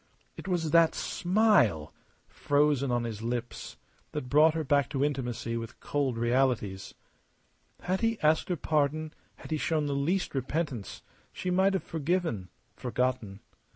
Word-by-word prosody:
It - - -9
was 170 -4 -1
that 165 0 +5
smile 175 - +2 0.3
frozen 145 -2 +1
on 120 -1 0
his 110 -2 -5
lips 120 +1 -4 0.4
that 140 -4 -4
brought 155 +3 +5
her 160 - -1
back 140 -2 +2
to 140 -1 0
intimacy 125 -5 -3
with 115 0 -7
cold 135 -5 -1
realities. 120 -5 0 0.9
Had 185 +1 -1
he 230 -1 +1
asked 155 +3 +2
her 180 - +1
pardon, 155 0 0 0.2
had - - -12
he 155 - +1
shown 155 0 0
the 145 - -1
least 165 +7 0
repentance, 135 - -3 0.3
she 180 - -3
might 190 +2 +3
have 190 - -1
forgiven, 160 - -2 0.3
forgotten. 125 -5 -2
145 Hz, 145 wpm, -29 LUFS, 120-165 Hz, 0.9 s, that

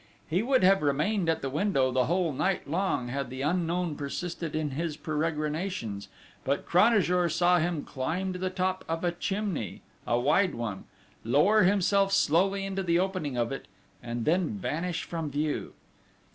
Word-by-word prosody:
He 175 +5 +1
would 260 0 +2
have 195 +1 +5
remained 165 +6 +1
at 165 - 0
the 135 - -1
window 145 -5 +1
the 125 0 +2
whole 175 -2 +1
night 190 +8 -1
long 165 -6 -1
had 135 0 -3
the 130 +1 -5
unknown 170 0 0
persisted 165 +3 -4
in 155 -2 -1
his 155 +2 -3
peregrinations; 155 - -2 0.4
but - - -1
Cranajour 180 -3 +3
saw 175 +2 +3
him 170 -2 -1
climb 170 +8 -2
to 180 - -6
the 185 0 -1
top 185 0 -1
of 165 +1 -2
a 175 - +2
chimney, 190 - -3 0.2
a 120 - +2
wide 175 +9 +2
one, 110 -5 -4 0.4
lower 150 - +4
himself 195 +1 +3
slowly 195 +2 +2
into 195 0 -2
the 170 -2 +2
opening 180 -8 -1
of 120 0 0
it, 135 - -6 0.3
and 120 -2 -4
then 175 +2 +2
vanish 175 -2 -2
from 165 -3 -4
view! 145 +1 -2
170 Hz, 165 wpm, -28 LUFS, 145-185 Hz, 0.4 s, have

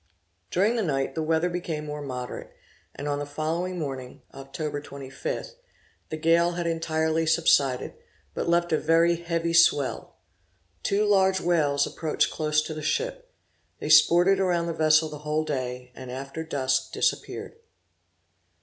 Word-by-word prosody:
During 210 +7 +2
the - - +1
night 135 -7 -1
the 160 - -2
weather 160 +2 +1
became 170 -4 -4
more 150 0 -5
moderate, 125 -3 -6 0.4
and 145 - -5
on 145 0 -1
the 145 - -3
following 165 +5 -2
morning, 135 -5 -6
(Oct. 145 +2 -5
25), 135 -2 -6 0.6
the 155 - -4
gale 170 +2 +3
had 175 0 -3
entirely 160 -1 0
subsided, 145 -5 +2 0.4
but - - -2
left 170 0 +2
a 155 - +2
very 165 +2 +3
heavy 170 0 -2
swell. 145 -5 +3 0.7
Two 205 - +1
large 190 -2 +3
whales 150 -5 +2
approached 155 -2 -1
close 150 -1 +1
to 155 - -5
the 155 - -6
ship. - - -2 0.5
They - - -5
sported 175 +5 +6
around 175 -3 +1
the 170 - -2
vessel 155 0 +4
the 150 -1 -8
whole 150 +1 -1
of 155 - -6
the - - +1
day, 125 -1 -4
and 130 +1 -10
after 135 +5 -6
dusk 135 -5 -1
disappeared. - - -2
155 Hz, 155 wpm, -26 LUFS, 145-170 Hz, 0.7 s, sported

